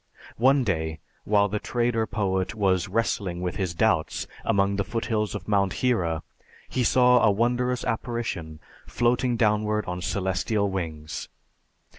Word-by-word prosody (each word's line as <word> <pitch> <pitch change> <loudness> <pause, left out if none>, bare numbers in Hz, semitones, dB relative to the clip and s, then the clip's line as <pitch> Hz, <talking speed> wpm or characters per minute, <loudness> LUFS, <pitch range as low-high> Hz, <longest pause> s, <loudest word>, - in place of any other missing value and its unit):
One 135 +3 +4
day, 80 -7 -1 0.3
while 105 -1 +3
the 105 +1 -2
trader 120 -1 0
poet 95 -2 -1
was 95 -3 +1
wrestling 95 -3 -1
with 90 0 -3
his 90 -4 -2
doubts - - +1 0.2
among 100 0 +1
the 100 - +1
foothills 105 0 -2
of 95 -5 -6
Mount 100 -3 +2
Hira, 90 -11 0 0.4
he 130 - -1
saw 125 +1 +5
a - - +5
wondrous 120 +4 +1
apparition 115 -10 -3 0.3
floating 120 0 +1
downward 105 -1 +1
on 90 0 -4
celestial 100 +2 0
wings. 80 -4 -5
105 Hz, 135 wpm, -26 LUFS, 95-120 Hz, 0.4 s, saw